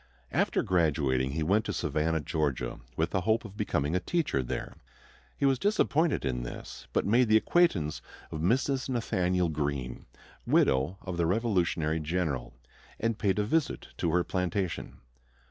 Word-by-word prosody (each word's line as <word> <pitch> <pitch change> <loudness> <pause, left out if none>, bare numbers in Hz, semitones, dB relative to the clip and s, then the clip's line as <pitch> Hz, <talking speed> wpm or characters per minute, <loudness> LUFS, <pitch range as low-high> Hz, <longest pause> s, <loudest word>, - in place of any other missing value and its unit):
After - - +1
graduating 70 -7 +1
he 80 +1 -1
went 100 +7 +3
to - - -2
Savannah, 80 +1 0
Georgia, 75 -3 -2 0.2
with - - 0
the 95 - +1
hope 110 +5 +1
of 100 -2 -9
becoming 85 -7 0
a - - +3
teacher 140 - 0
there. 60 - -4 0.6
He - - +1
was 135 -2 +3
disappointed 170 - +2
in 60 -2 -1
this; - - -8
but - - +1
made 120 +4 +4
the 110 0 +6
acquaintance 105 - +2 0.3
of 80 - -4
Mrs. 130 - +1
Nathanael 90 -7 +1
Greene, 70 -5 -3 0.4
widow 70 +8 +2
of 90 -2 -4
the 85 -1 +2
Revolutionary 90 -6 +1
general, 80 -5 -2 0.4
and 115 -1 -1
paid 95 -4 +1
a 105 - +2
visit 150 +8 -1
to 85 - 0
her 90 0 +3
plantation. 90 0 -2
90 Hz, 155 wpm, -29 LUFS, 75-110 Hz, 0.6 s, the